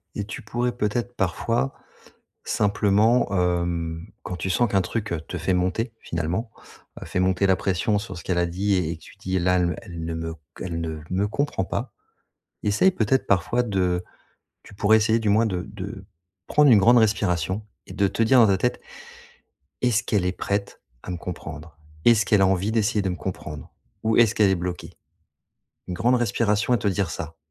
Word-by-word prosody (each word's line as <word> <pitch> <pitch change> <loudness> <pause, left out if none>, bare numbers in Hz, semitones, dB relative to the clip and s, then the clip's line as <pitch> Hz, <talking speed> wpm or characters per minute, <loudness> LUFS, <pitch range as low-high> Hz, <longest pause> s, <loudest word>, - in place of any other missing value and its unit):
et 100 - -2
tu 110 +5 -7
pourrais 120 +3 -1
peut-être 120 +3 -1
parfois, 115 +8 0 0.7
simplement, 105 +3 +2
hem, 85 -2 -1 0.2
quand 90 - -5
tu 95 - -3
sens 115 +3 +2
qu'un 95 - +3
truc, 110 0 -3
heu, 80 - -2
te 90 - -7
fait 90 +3 0
monter 95 +6 0
finalement 85 +8 -3 0.5
heu, - - -6
fait 90 - -1
monter 95 +1 +2
la 95 -1 +4
pression 100 +3 0
sur 100 -3 -7
ce 90 - -8
qu'elle 90 -2 0
a 85 - +2
dit 95 +4 0
et 85 -3 -1
que - - -21
tu - - -14
dis: 95 -1 -1
«Là 90 +1 +2
elle 90 - +2
me - - -4
elle 85 -5 -7
ne 80 0 -3
me 80 0 -4
c 80 - -12 0.2
elle 85 -2 -3
ne 80 -1 -4
me 95 +3 0
comprend 140 -4 -1
pas», - - -4 0.7
essaye 105 - +3
peut-être 130 - +1
parfois 100 +6 +2
de 90 -5 0 0.6
tu - - -15
pourrais 105 +2 +4
essayer, 110 +1 +2
du 110 - -1
moins 110 +3 +4
de 90 -3 -2
de 100 0 -7 0.4
prendre 150 -2 +5
une 110 - +8
grande 120 +5 +6
respiration 100 -2 +1 0.2
et - - -10
de 100 -1 +2
te 115 - -1
dire 125 +3 +5
dans 115 - +7
ta 95 -1 +3
tête: 125 - 0 1.0
«Est-ce 120 -3 +2
qu'elle 100 -5 +1
est 90 - +1
prête 100 +2 -3 0.2
à - - -7
me 90 - -3
comprendre? 80 -3 -8 0.3
Est-ce 110 -4 +5
qu'elle 100 -1 +4
a 95 - +6
envie 95 +2 +1
d'essayer 110 -1 +1
de 95 - -1
me 90 - -2
comprendre? 75 -5 -7 0.3
Ou 110 +1 +2
est-ce 115 -2 +5
qu'elle 105 -3 +4
est - - +3
bloquée?» 90 0 -4 1.0
Une - - -3
grande 115 +8 +2
respiration 115 -1 +1
à 120 - +4
te 105 - 0
dire 95 -2 0
ça. 80 -1 -6
100 Hz, 200 wpm, -24 LUFS, 90-110 Hz, 1.0 s, une